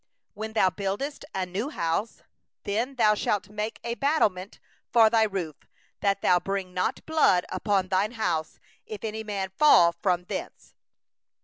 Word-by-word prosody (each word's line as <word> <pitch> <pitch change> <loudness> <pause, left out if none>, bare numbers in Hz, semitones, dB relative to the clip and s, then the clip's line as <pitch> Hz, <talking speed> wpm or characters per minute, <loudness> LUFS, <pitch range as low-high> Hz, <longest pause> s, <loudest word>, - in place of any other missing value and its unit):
8When 220 +1 -6
thou 190 -4 +4
buildest 205 - -4
a 190 - -1
new 195 +9 -3
house, 170 - -2 0.4
then 230 +7 -2
thou 215 -4 +4
shalt 205 -1 -1
make 210 +1 -4
a 235 - -2
parapet 210 -10 0 0.3
for 225 -2 +6
thy 225 -1 +4
roof, 180 -8 -4 0.4
that 200 -1 0
thou 180 -1 +4
bring 195 -1 -4
not 180 0 -2
blood 310 - +3
upon 195 -3 0
thy 195 +2 +1
house, 170 -9 -2 0.3
if 215 -2 -8
any 220 0 -4
man 200 -3 -4
fall 175 - +7
from 180 -2 +1
thence. - - -7
205 Hz, 150 wpm, -26 LUFS, 185-220 Hz, 0.4 s, fall